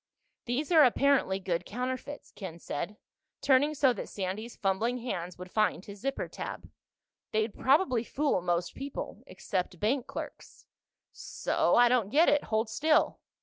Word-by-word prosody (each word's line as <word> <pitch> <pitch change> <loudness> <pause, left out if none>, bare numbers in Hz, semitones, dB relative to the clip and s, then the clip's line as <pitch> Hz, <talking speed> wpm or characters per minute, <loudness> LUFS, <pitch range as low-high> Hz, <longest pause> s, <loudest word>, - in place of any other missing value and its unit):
"These 270 +7 -2
are 320 -3 +8
apparently 265 -6 +3
good 180 -2 -2
counterfeits," 255 +7 -5
Ken 185 -5 -8
said, 170 +5 -5 0.4
turning 285 +3 +3
so 265 -3 +4
that - - -6
Sandy's 205 +4 -4
fumbling 215 +5 0
hands 180 -8 -4
would 180 0 -9
find 215 -4 +1
his 200 0 -10
zipper 275 +5 -2
tab. - - -7 0.6
"They'd 215 0 0
probably 265 -4 +3
fool 285 -4 0
most 175 0 -1
people—except 190 -9 -5
bank 245 +4 0
clerks." - - -8 0.5
"So? - - 0
I 245 0 +7
don't 240 -5 +2
get 310 +9 +5
it. 290 0 +2
Hold 220 +1 0
still." 305 +8 +2
235 Hz, 145 wpm, -30 LUFS, 190-275 Hz, 0.6 s, are